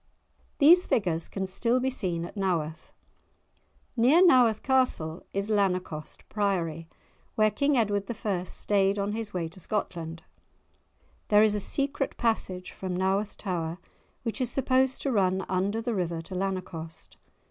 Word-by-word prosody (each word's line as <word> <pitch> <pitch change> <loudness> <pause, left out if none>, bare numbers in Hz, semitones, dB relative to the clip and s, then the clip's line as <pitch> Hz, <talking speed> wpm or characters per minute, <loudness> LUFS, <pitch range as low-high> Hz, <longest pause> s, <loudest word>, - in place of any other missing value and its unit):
These 345 +5 +6
figures 170 -6 0
can 195 -1 -3
still 230 +6 0
be 260 +1 0
seen 175 -8 -2
at 175 - -10
Naworth. 170 -6 -2 1.0
Near 275 +10 +5
Naworth 245 - +5
Castle 250 -11 +1
is 200 +1 -2
Lanercost 185 -7 -1
Priory, 170 -6 -1 0.5
where 215 -1 +3
King 280 +2 +1
Edward 205 -3 0 0.2
I. 190 -4 0
stayed 200 +1 +1
on 200 0 -1
his 220 -1 -4
way 175 -4 -2
to 180 - -14
Scotland. 170 -4 -4 1.0
There 210 0 +6
is 215 -1 +4
a 210 - 0
secret 275 +6 -2
passage 190 -6 -1
from 185 -2 -4
Naworth 195 +3 0
tower 170 -4 -3 0.5
which 230 +2 -3
is 250 - 0
supposed 260 0 +1
to 275 - 0
run 190 -3 +1
under 200 +4 -1
the 240 0 -1
river 175 -4 -2
to 175 - -10
Lanercost. 180 -4 -5
195 Hz, 145 wpm, -28 LUFS, 180-230 Hz, 1.0 s, These